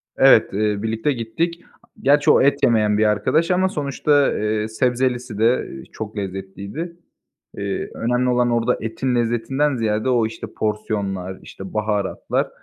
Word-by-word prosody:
Evet, 135 -7 +5
eee, 105 0 0
birlikte 115 +6 0
gittik. 160 +9 -3 0.4
Gerçi 145 +2 +4
o - - +5
et 140 +1 +2
yemeyen 110 -4 +3
bir 110 - +3
arkadaş 105 - +2
ama 185 +1 +2
sonuçta, 145 -2 +1
eee, 105 0 -1
sebzelisi 125 0 -1
de, 115 +4 +2
eee, 65 - -9
çok 110 0 -7
lezzetliydi. 100 - -6 0.6
Eee, 100 -1 -3
önemli 125 +2 0
olan 125 -1 +2
orada 120 +1 +1
etin 125 +3 -2
lezzetinden 120 +5 0
ziyade 110 +1 0
o, 120 -3 +3
işte, 110 - -8
porsiyonlar, 100 -3 -2
işte, 95 -1 -10
baharatlar, 105 -2 -1
115 Hz, 145 wpm, -21 LUFS, 105-130 Hz, 0.6 s, Evet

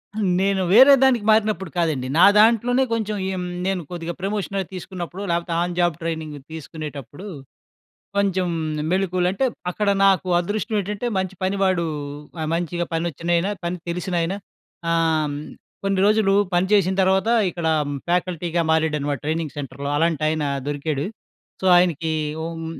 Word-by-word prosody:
హ్మ్. 205 -4 +1
నేను 195 0 +1
వేరే 265 +6 +9
దానికి 245 -5 +3
మారినప్పుడు 215 -5 +1
కాదండి. 150 -7 0
నా - - +8
దాంట్లోనే 235 +4 +4
కొంచెం 215 -2 -1 0.2
ఎమ్ 180 -1 -3 0.2
నేను 190 -2 0
కొద్దిగా 170 -1 -4
ప్రమోషన‌వి 195 -1 -2
తీసుకున్నప్పుడు, 180 0 -6
లేపోతే 170 0 -1
ఆన్ 175 0 -2
జాబ్ 175 -2 +2
ట్రైనింగ్ 160 -2 -4
తీసుకునేటప్పుడు, 155 - -8 0.9
కొంచెం 190 -2 +1 0.3
మ్ - - -4
మెళకువలు 185 -1 +1
అంటే 195 +8 -1 0.3
అక్కడ 205 +3 -1 0.2
నాకు 190 -2 +3
అదృష్టం 215 +5 -2
ఏటంటే 210 +4 -3
మంచి 190 0 -2
పనివాడు, 190 -2 +1 0.6
ఆహ్, 155 - -2
మంచిగా 175 0 -1
పనోచ్చినాయన 170 +2 0 0.2
పని 170 +1 -2
తెలిసిన 180 +2 -3
ఆయన 165 +3 -1 0.6
ఆహ్, 160 -3 +1 0.5
కొన్ని 195 -1 +1
రోజులు 210 -2 +3 0.2
పని 175 +1 +3
చేసిన 190 -2 +4
తర్వాత 190 +3 +2 0.2
ఇక్కడ 170 -1 -4 0.4
ఫ్యాకల్టీగా 175 -1 0
మారాడన్నమాట 150 -4 0
ట్రైనింగ్ 155 -2 -2
సెంటర్‌లో 140 0 -5
అలాంటి 160 0 +1
ఆయన 155 -1 0 0.2
దొరికాడు. 145 0 -2 0.6
సో, 190 - -2
ఆయనకి 170 -3 +2 0.3
హ్మ్. 165 0 -5
175 Hz, 135 wpm, -22 LUFS, 160-195 Hz, 0.9 s, వేరే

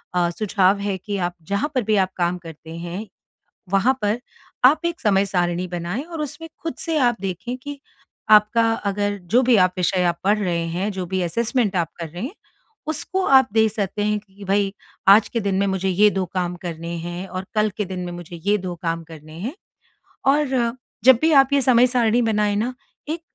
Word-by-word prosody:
अ, 175 -1 +2
सुझाव 195 +1 +1
है 200 -1 -2
कि 200 +2 -4
आप 175 -1 -1
जहाँ 200 - -1
पर 255 - +2
भी 215 0 +1
आप - - -15
काम 175 0 0
करते 160 0 -10
हैं 175 +5 -6 0.7
वहाँ 200 +7 +4
पर 210 +3 +1 0.5
आप 275 +5 +6
एक 340 -1 -3
समय 200 -2 +3
सारिणी 180 -1 0
बनाएँ 175 +7 -3
और 330 -1 -7
उसमें 300 +3 -7
खुद 325 - -3
से 330 -2 -2
आप 240 -4 +3
देखें 195 +6 -4
कि 285 +2 -8 0.5
आपका 215 +2 +5 0.2
अगर 205 0 -1
जो 250 +2 +5
भी 250 -2 +4
आप 185 -2 +4
विषय 180 +1 +1
आप 170 -1 +1
पढ़ 210 +2 +3
रहे 170 -4 -1
हैं, 180 +5 -2
जो 185 -2 -4
भी 185 +1 -2
असेसमेंट 220 +3 0
आप 170 -3 +1
कर 165 - -4
रहे 175 +5 -8
हैं, 260 - -4 0.5
उसको 370 +4 -2
आप 265 -2 +6
देख 220 -1 +3
सकते 205 -1 -2
हैं 210 0 +1
कि 200 0 -15
भई 195 0 +1 0.4
आज 200 +2 +7
के 230 - -2
दिन 200 -2 -1
में 200 - +2
मुझे 190 0 -1
ये 200 +3 +5
2 190 -2 -1
काम 180 -1 -1
करने 170 -1 -5
हैं 175 +3 -5
और 185 0 -5
कल 215 0 +2
के 210 - 0
दिन 185 0 -5
में 175 - -5
मुझे 175 0 -8
ये 205 +1 +4
2 180 -2 -5
काम 165 -1 -2
करने 155 -1 -13
हैं। 240 - -4 0.8
और 295 0 +1 0.6
जब 260 -2 +8
भी 320 - +3
आप 275 0 +5
ये 280 - +4
समय 250 0 +5
सारिणी 240 -1 +2
बनाए 210 -2 +1
न, 235 +5 -1 0.4
एक 325 +2 -3
200 Hz, 210 wpm, -22 LUFS, 180-235 Hz, 0.8 s, जब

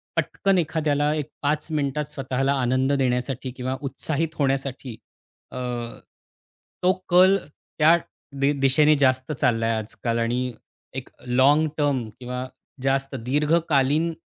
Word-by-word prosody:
पटकन 195 -1 +1
एखाद्याला 150 -3 +1
एक 150 -1 -3
5 150 +1 0
मिनिटात 150 0 -1
स्वतःला 135 -1 -1
आनंद 130 +2 +1
देण्यासाठी 130 -1 -1
किंवा 130 0 -2
उत्साहित 150 +3 -3
होण्यासाठी. 135 -3 -1 0.6
अ, - - -7 1.3
तो 185 +1 +5 0.2
कल 185 +2 +6
त्या 155 +2 +2 0.5
दि 140 - +4 0.2
दिशेने 150 +3 +4
जास्त 130 +2 +1
चाललाय 115 -5 +1
आजकाल 115 +2 -3
आणि 125 +2 0 0.5
एक - - -6 0.2
लाँगटर्म 145 0 +2
किंवा 125 0 -5 0.4
जास्त 135 0 0
दीर्घकालीन 150 +2 +2
140 Hz, 110 wpm, -24 LUFS, 130-150 Hz, 1.3 s, कल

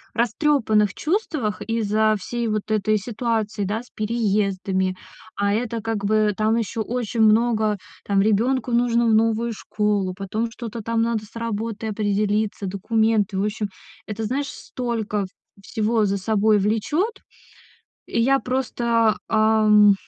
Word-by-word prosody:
растрёпанных 230 -4 +2
чувствах 310 - -1
из-за 220 -1 +1
всей 235 +4 -3
вот 215 0 -2
этой 215 0 +2
ситуации, 220 -1 -2
да, 220 +5 -2
с - - -22
переездами. 195 -4 0 0.4
А 200 0 +1
это 230 +1 -1
как 220 -3 -2
бы 215 0 +2
там 220 +2 +2
ещё 225 0 -2
очень 235 0 -2
много: 220 -1 +3 0.3
там 200 -1 +1
ребёнку 230 +5 +2
нужно 235 0 +2
в 225 - +3
новую 225 +1 +2
школу, 205 -3 -1
потом 215 +4 -2
что-то 230 -1 -7
там 230 +1 0
надо 230 -2 -1
с 210 - -21
работой 225 -1 -3
определиться, 205 0 0
документы. 210 +1 +1
В 195 - +1
общем, 210 0 -2 0.4
это, 215 +1 -4
знаешь, 270 +6 -1
столько 225 -7 -3 0.4
всего 215 +1 0
за 200 0 0
собой 215 +2 +2
влечёт. 295 - 0 0.9
И 230 - -1
я 270 +3 +4
просто, 235 -4 +1
ам, 215 -2 +5
220 Hz, 135 wpm, -23 LUFS, 210-230 Hz, 0.9 s, ам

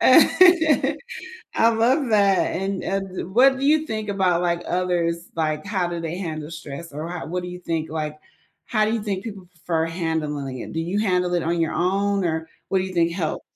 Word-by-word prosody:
I 320 -6 +5 0.8
love 240 +4 +2
that, 200 -3 +3
and 195 +1 -2
and 190 -2 -3
what 265 +4 +6
do 275 - -2
you 310 +1 +3
think 215 -1 -3
about, 185 -3 +2
like, 170 -1 0
others 175 -1 -1
like 155 -1 -1
how 190 -4 0
do 175 0 -4
they 165 +1 -4
handle 155 -4 -5
stress 160 0 -8
or 150 +3 -5
how 175 -1 -5
what 180 +3 -3
do 180 - -6
you 180 0 -8
think? 165 -3 -3
Like, 155 -1 -4 0.5
how 215 -2 +1
do 220 - 0
you 230 - -1
think 200 -2 -3
people 200 -5 -8
prefer 165 -1 -2
handling 155 -5 -3
it? - - -7
Do 160 - -2
you 175 +5 -1
handle 180 -4 +1
it 175 -2 +1
on 170 +1 0
your 165 -1 0
own 195 +2 +1
or 160 -1 -1 0.2
what 190 - +2
do - - -1
you 185 0 -5
think 170 -1 +2
help? 170 -4 -2
180 Hz, 205 wpm, -23 LUFS, 165-200 Hz, 0.8 s, what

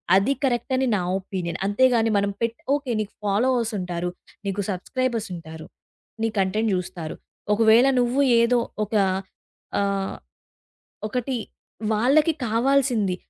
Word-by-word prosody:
అది 200 +9 +3
కరెక్ట్ 240 0 -1
అని 260 0 +1
నా - - +1 0.2
ఒపీనియన్. 185 -3 -4
అంతేగాని 230 +1 +3
మనం 200 0 +1
పెట్ 230 0 -1 0.2
ఓకే. 285 -3 -3
నీకు 210 - -6
ఫాలోవర్స్ 230 +3 +1
ఉంటారు, 180 -1 -3 0.4
నీకు 200 +1 -1
సబ్‌‌స్క్రైబర్స్ 230 +3 -2
ఉంటారు. 160 -1 -9 0.6
నీ 225 - +2
కంటెంట్ 210 +4 +1
జూస్తారు. 180 -3 -5 0.4
ఒకవేళ 225 +4 +5
నువ్వు 245 +3 +2 0.2
ఏదో 240 +1 +3 0.3
ఒక 215 - -13 0.9
ఆహ్, 195 -1 -1 0.9
ఒకటి 250 +3 -2 0.6
వాళ్ళకి 285 +9 +3
కావాల్సింది, 235 -4 +2
225 Hz, 115 wpm, -24 LUFS, 195-250 Hz, 0.9 s, ఒకవేళ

